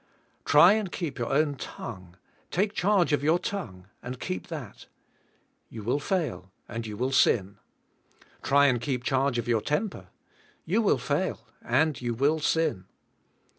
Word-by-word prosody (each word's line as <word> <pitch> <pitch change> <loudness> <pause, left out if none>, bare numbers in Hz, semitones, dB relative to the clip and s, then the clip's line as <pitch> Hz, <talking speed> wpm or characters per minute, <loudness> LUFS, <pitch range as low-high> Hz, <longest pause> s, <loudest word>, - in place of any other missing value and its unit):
Try 170 +7 +7
and 210 -4 -1
keep 150 -7 -4
your 120 - -2
own 145 +1 +2
tongue 90 -8 -8 0.2
— - - -35
take 200 +3 0
charge 195 -5 +2
of 145 - +2
your 155 +4 +3
tongue 120 - -5 0.2
and 125 +1 -7
keep 185 - -4
that; 145 -11 -8 0.8
you 110 - -8
will 125 +7 0
fail 130 - -2 0.2
and 115 -1 -5
you 105 -1 -6
will 130 +3 -1
sin. 100 -6 +2 0.8
Try 140 +1 +4
and 125 -4 +2
keep 125 -1 -2
charge 135 -1 +1
of 120 - -2
your 115 -2 +2
temper. 150 - -2 0.6
You 205 +8 +2
will 215 - +3
fail 145 -6 -2 0.2
and 140 +4 +1
you 120 -1 -2
will 145 +6 +2
sin. 150 - 0
135 Hz, 160 wpm, -27 LUFS, 115-165 Hz, 0.8 s, Try